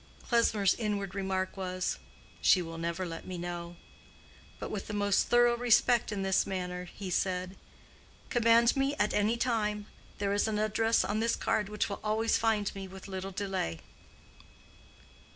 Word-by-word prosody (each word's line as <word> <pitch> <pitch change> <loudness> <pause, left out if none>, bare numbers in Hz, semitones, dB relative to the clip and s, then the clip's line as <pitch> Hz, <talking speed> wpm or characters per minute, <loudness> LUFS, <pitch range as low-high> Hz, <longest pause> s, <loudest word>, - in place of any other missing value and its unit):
Klesmer's 220 -5 +3
inward 205 -4 -2
remark 190 -1 -2
was, 185 -1 -2 0.4
"She 185 - +6
will 165 -1 -5
never 170 +2 -2
let 165 -1 -6
me 185 -1 -5
know." 175 0 -5 0.8
But - - -6
with 205 -2 -4
the 210 - -4
most 205 -1 +2
thorough 240 0 +5
respect 240 -1 +3
in 200 -2 -2
his 190 0 +2
manner, 180 -1 -3
he 185 +1 -7
said, 185 +1 -1 0.8
"Command 235 +1 +5
me 275 +1 +1
at 210 -6 +1
any 215 +3 +2
time. 210 -4 0 0.3
There 200 -1 0
is 205 +2 +2
an 215 -1 -1
address 220 +2 +2
on 210 +1 -1
this 230 +1 +1
card 210 -2 0
which 210 0 -1
will 200 - -5
always 220 +1 +1
find 220 -3 +1
me 195 -1 -6
with 190 +1 -11
little 190 0 -5
delay." 190 - -3
200 Hz, 160 wpm, -30 LUFS, 185-220 Hz, 0.8 s, She